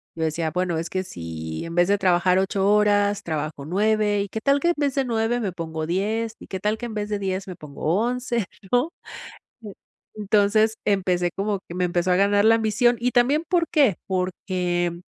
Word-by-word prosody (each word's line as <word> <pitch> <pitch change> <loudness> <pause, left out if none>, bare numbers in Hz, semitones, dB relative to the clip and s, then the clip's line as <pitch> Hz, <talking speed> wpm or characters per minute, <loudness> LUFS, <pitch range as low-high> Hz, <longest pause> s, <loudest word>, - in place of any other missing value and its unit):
Yo 160 - -3
decía: 160 0 -1
"Bueno, 180 0 -1
es 165 0 -3
que 185 0 -2
si, 80 - -6
en 165 - -7
vez 175 +1 +4
de 205 - +3
trabajar 180 -1 +3
8 195 0 0
horas, 205 -1 +2
trabajo 155 -3 -4
9, 210 +3 +1
y 200 - -3
que 220 - -5
tal 280 +2 +3
que 345 - +1
en 345 - +3
vez 285 -2 0
de 270 -1 +1
9, 230 +1 0
me 205 -5 -2
pongo 160 -2 -4
10, 215 +6 -1
y - - -12
que 190 - -5
tal 210 +2 0
que 240 - -5
en 220 - -7
vez 210 -1 -3
de 205 - -2
10, 190 0 -3
me 185 - -7
pongo 145 -3 -11 0.2
11," 240 -2 -1 0.3
¿no? 250 +7 +2 0.7
Eh, 205 -3 -8 0.4
entonces, 215 +1 +2
empecé 180 -3 +1
como 200 0 -2
que 170 - -8
me 180 0 +1
empezó 175 +1 0
a - - +4
ganar 205 +1 +3
la 225 +1 +6
ambición, 230 +2 +2
y 250 +1 0
también, 270 +6 +3
¿por 340 -2 +1
qué?, 275 - +4
porque, 180 -2 -2
200 Hz, 210 wpm, -23 LUFS, 175-220 Hz, 0.7 s, la